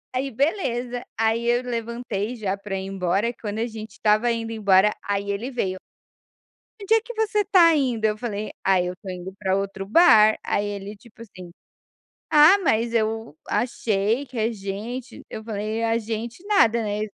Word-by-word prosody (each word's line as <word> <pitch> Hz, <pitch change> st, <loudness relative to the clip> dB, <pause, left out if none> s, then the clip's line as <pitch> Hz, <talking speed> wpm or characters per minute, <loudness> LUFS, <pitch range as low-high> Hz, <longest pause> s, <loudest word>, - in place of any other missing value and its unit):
Aí, 270 Hz, +1 st, -1 dB
beleza, 245 Hz, -, -1 dB
aí 225 Hz, +1 st, +1 dB
eu 240 Hz, +1 st, +3 dB
levantei 235 Hz, -2 st, -4 dB
já 200 Hz, -3 st, -2 dB
para 195 Hz, -1 st, -6 dB
ir 190 Hz, 0 st, -4 dB
embora. 195 Hz, +4 st, 0 dB
Quando 210 Hz, 0 st, -4 dB
a 235 Hz, -, 0 dB
gente 220 Hz, -1 st, -8 dB
estava 215 Hz, +3 st, +2 dB
indo 225 Hz, -1 st, -3 dB
embora, 210 Hz, -1 st, +3 dB
aí 200 Hz, 0 st, -2 dB
ele 230 Hz, +7 st, -4 dB
veio. 190 Hz, -6 st, -2 dB, 1.0 s
"Onde 405 Hz, +2 st, 0 dB
é 450 Hz, -, +4 dB
que 480 Hz, +1 st, -9 dB
você 435 Hz, -1 st, 0 dB
está 365 Hz, -5 st, +5 dB
indo?", 245 Hz, -6 st, 0 dB
eu 210 Hz, 0 st, +1 dB
falei: 215 Hz, -2 st, -4 dB
"Ai, 185 Hz, -2 st, +2 dB
eu 180 Hz, -, -3 dB
estou 190 Hz, +1 st, -11 dB
indo 180 Hz, +1 st, -7 dB
para 190 Hz, -2 st, 0 dB
outro 195 Hz, 0 st, -3 dB
bar." 220 Hz, -, +6 dB
Aí 205 Hz, -, 0 dB
ele, 205 Hz, 0 st, -6 dB
tipo 230 Hz, +2 st, -18 dB
assim: 185 Hz, -5 st, -11 dB, 0.8 s
"Ah, 310 Hz, +7 st, +7 dB
mas 235 Hz, -, +1 dB
eu 225 Hz, -6 st, -1 dB
achei 230 Hz, +1 st, 0 dB
que 250 Hz, -2 st, -8 dB
a 225 Hz, +2 st, +1 dB
gente", 225 Hz, +5 st, -6 dB
eu 220 Hz, -, -6 dB
falei: 215 Hz, +1 st, -3 dB
"A 225 Hz, 0 st, +2 dB
gente 230 Hz, -, -5 dB
nada.", 235 Hz, -, +3 dB
né, 210 Hz, 0 st, -2 dB
225 Hz, 175 wpm, -23 LUFS, 200-245 Hz, 1.0 s, Ah